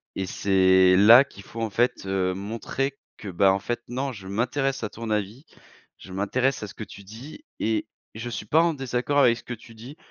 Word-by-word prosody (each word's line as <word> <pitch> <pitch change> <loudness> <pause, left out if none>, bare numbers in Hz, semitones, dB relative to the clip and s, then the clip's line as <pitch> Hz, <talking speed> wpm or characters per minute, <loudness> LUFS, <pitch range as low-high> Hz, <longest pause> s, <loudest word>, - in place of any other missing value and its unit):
et 95 - -2
c'est 95 -1 +4
là 115 +7 +8
qu'il 100 -7 -14
faut 115 - -8
en 110 - -1
fait, 120 -1 0
heu, 95 -1 0
montrer 115 +7 -4 0.2
que 105 - -10
bah, 95 +1 +3
en 95 - 0
fait 120 +3 -4
non: 130 +2 -2
«Je 95 -3 -11
m'intéresse 130 +6 -1
à 105 - -2
ton 115 0 -7
avis, 105 - -3 0.5
je 95 - -12
m'intéresse 125 +6 0
à - - -4
ce - - -11
que 110 - -8
tu 100 - -13
dis 120 - -11 0.2
et 110 -1 0 0.3
je 115 +2 -5
suis 110 -2 -5
pas 160 +9 +4
en 170 -1 +2
désaccord 135 +1 -1
avec 120 -4 +4
ce - - -13
que 125 - -6
tu 115 0 -13
dis. 125 +7 -11
115 Hz, 220 wpm, -25 LUFS, 100-130 Hz, 0.5 s, là